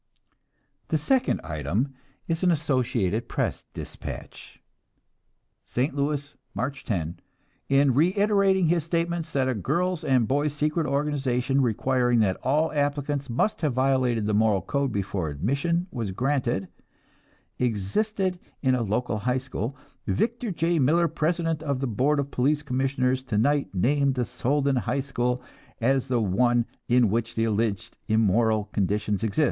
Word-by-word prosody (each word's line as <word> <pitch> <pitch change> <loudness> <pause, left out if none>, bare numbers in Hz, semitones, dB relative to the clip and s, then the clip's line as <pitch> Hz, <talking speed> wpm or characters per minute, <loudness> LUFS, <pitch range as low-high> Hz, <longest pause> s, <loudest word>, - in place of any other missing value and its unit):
'" - - -46
The 155 - +2
second 260 - +1
item 85 - -2 0.3
is 165 0 -1
an 185 - +3
Associated 125 - 0
Press - - -2
despatch: - - -8 1.0
"ST. 130 +4 -1
LOUIS, 145 0 -2 0.2
March 130 +6 -3
10. 85 -6 -2 0.5
In 140 -1 +4
reiterating 195 - +3
his 170 0 +2
statement 170 0 -1
that 135 -4 0
a 130 - +1
girls' 170 - -1
and 130 -3 +3
a - - 0
boys' 145 +4 0
secret 150 +2 0
organization 140 -2 0
requiring 125 +1 +2
that 95 -3 +1
all 150 +5 +1
applicants 145 -1 -1
must 205 - 0
have 150 -5 +1
violated 130 -4 +2
the 105 - 0
moral 105 -3 +3
code 140 +2 -1
before 100 -5 -2
admission 140 - 0
was 115 -5 -3
granted, 120 -2 0 0.9
existed 180 - 0 0.2
in 130 -1 +3
a 125 - +1
local 110 +1 -1
high 125 +4 0
school, 130 0 -4 0.3
Victor 230 - 0
J. 170 -1 +1
Miller, 165 +6 +3
president 165 -1 -1
of 140 -4 -1
the 135 - -1
Board 135 +6 +1
of 140 0 -2
Police 145 +4 +1
Commissioners, 130 -1 0
tonight 135 +4 +1
named 140 +7 +2
the 125 -2 0
Soldan 140 +2 0
High 125 +5 0
School 125 -2 -1 0.4
as 130 +2 +1
the 125 -2 +1
one 120 +4 +2 0.2
in 120 -4 +4
which 115 +1 -1
the 115 - +1
alleged 110 0 -1
immoral 110 0 +3
conditions 105 +1 0
exist. 110 +5 -1
130 Hz, 145 wpm, -26 LUFS, 115-150 Hz, 1.0 s, In